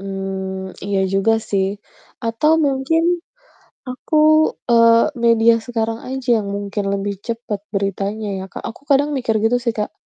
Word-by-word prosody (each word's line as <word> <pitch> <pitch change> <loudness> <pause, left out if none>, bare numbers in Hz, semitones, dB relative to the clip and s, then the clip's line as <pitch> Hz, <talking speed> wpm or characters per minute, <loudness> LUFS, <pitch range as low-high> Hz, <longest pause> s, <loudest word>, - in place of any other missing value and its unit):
Mmm, 190 -1 -5
iya 200 0 -1
juga 195 +4 +2 0.2
sih. 195 -2 +2 0.6
Atau 230 +7 +1 0.2
mungkin 275 +4 +1 0.8
aku 255 +4 -5 0.6
eee, 230 +4 +5
media 230 0 +5
sekarang 225 -1 -3
aja 265 0 -5
yang 205 - -5
mungkin 200 0 -3
lebih 200 0 -2
cepet 230 -3 -4 0.2
beritanya 200 +2 -2
ya, - - -5
Kak, - - -9
aku 230 - -7
kadang 285 +1 +3
mikir 250 -6 -1
gitu 240 +2 +2
sih, 235 -2 -2
Kak, 210 -1 -3
225 Hz, 145 wpm, -19 LUFS, 200-245 Hz, 0.8 s, eee